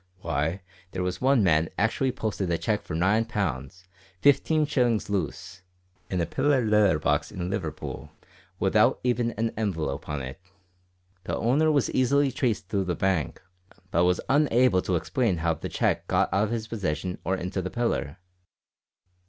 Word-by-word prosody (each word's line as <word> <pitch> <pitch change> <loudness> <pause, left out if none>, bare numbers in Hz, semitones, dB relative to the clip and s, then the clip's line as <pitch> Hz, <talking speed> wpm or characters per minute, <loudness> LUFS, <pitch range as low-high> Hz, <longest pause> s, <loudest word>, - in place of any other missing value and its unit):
Why, 80 +3 -2 0.3
there 90 - -2
was 90 0 -3
one 130 -3 +4
man 80 -3 +3
actually 115 +5 +1
posted 105 -6 -3
a 85 - +1
cheque - - -1
for - - -6
9 100 +7 +2
pounds, 95 - -3 0.4
15 145 +2 +4
shillings 120 -8 +1
loose, 95 0 -3 0.5
in 90 - -1
a 85 - +1
pillar 130 - +1
letter 105 -6 +4
box - - 0
in 90 0 -4
Liverpool, 80 -6 -5 0.5
without - - +3
even 120 -1 +1
an 115 +1 -1
envelope 80 -11 -3
on 75 -2 -3
it. 65 +8 -8 0.8
The - - -2
owner 145 +7 +2
was 145 -4 +1
easily 140 +2 +2
traced 120 -7 -1
through 100 -2 -1
the 90 -1 -1
bank, 95 -7 -1 0.5
but 85 +2 +3
was 90 0 +2
unable 130 -8 +3
to 90 - -1
explain 110 - 0
how 80 0 +1
the 80 - -6
cheque - - 0
got - - +1
out 100 +2 +3
of - - -4
his 110 -2 -3
possession 90 -5 -3
or 95 - 0
into 90 +1 -3
the 95 - -4
pillar. 95 -11 -2
95 Hz, 165 wpm, -26 LUFS, 85-120 Hz, 0.8 s, one